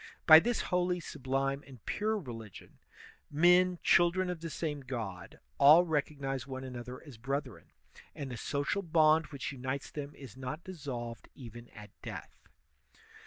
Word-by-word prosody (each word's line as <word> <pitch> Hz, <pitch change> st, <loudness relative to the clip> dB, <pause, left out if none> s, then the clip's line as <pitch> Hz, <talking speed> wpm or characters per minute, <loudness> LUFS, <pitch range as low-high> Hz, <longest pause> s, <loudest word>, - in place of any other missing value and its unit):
By 155 Hz, -2 st, +11 dB
this 240 Hz, +6 st, 0 dB
holy, 180 Hz, 0 st, +2 dB
sublime, 135 Hz, -2 st, -2 dB
and 130 Hz, -6 st, -14 dB
pure 215 Hz, +1 st, 0 dB
religion, 115 Hz, -, -9 dB, 0.5 s
men, 180 Hz, +4 st, +4 dB
children 180 Hz, +1 st, +4 dB
of 175 Hz, -, -5 dB
the 165 Hz, -, -4 dB
same 150 Hz, -2 st, -3 dB
God, 115 Hz, -9 st, -6 dB, 0.2 s
all 155 Hz, +5 st, +8 dB
recognize 140 Hz, -4 st, -2 dB
one 130 Hz, -1 st, -6 dB
another 125 Hz, -1 st, -7 dB
as 140 Hz, -7 st, -12 dB
brethren, 135 Hz, +4 st, -4 dB, 0.5 s
and 140 Hz, -3 st, -5 dB
the 120 Hz, -, -5 dB
social 145 Hz, -, -1 dB
bond 160 Hz, -2 st, +4 dB
which 140 Hz, -3 st, -5 dB
unites 130 Hz, +1 st, -4 dB
them 145 Hz, -1 st, -6 dB
is 130 Hz, -7 st, -11 dB
not 130 Hz, +5 st, -6 dB
dissolved 130 Hz, -10 st, -6 dB
even 120 Hz, -2 st, -11 dB
at 105 Hz, -2 st, -12 dB
death. -, -, -9 dB
140 Hz, 145 wpm, -32 LUFS, 130-165 Hz, 0.5 s, By